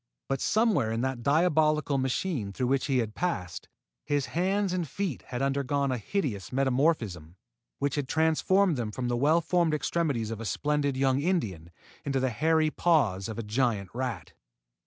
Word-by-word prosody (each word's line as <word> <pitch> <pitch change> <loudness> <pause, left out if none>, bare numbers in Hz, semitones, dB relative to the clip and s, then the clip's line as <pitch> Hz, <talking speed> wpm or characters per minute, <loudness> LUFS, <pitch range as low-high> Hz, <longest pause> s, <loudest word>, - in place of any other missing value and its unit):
But, 135 -1 -2
somewhere 210 - +2
in 115 +1 -1
that 130 -2 -2
diabolical 155 0 +2
machine 130 - -1
through 125 +6 -2
which 135 +1 +1
he 135 -3 +1
had 110 -3 -1
passed, 90 - -3 0.3
his 145 -2 0
hands 190 +2 +1
and 175 -3 -1
feet 185 0 -3
had 125 0 -3
undergone 140 0 0
a 125 - -1
hideous 110 - -3
metamorphism 125 - 0 0.4
which 140 0 -1
had 145 -3 -2
transformed 160 +3 +2
them 115 -3 -2
from 125 +2 -3
the 120 - +1
well 150 +7 +3
formed 170 -2 +1
extremities 140 -6 -1
of 115 0 -5
a - - -5
splendid 145 +3 0
young 135 0 +2
Indian 110 - -1 0.3
into 135 -1 -1
the 130 -1 0
hairy 155 +5 +2
paws 115 - +1
of 110 - -6
a 115 - -3
giant 105 -4 0
rat! 120 -8 -4
135 Hz, 170 wpm, -28 LUFS, 115-160 Hz, 0.4 s, well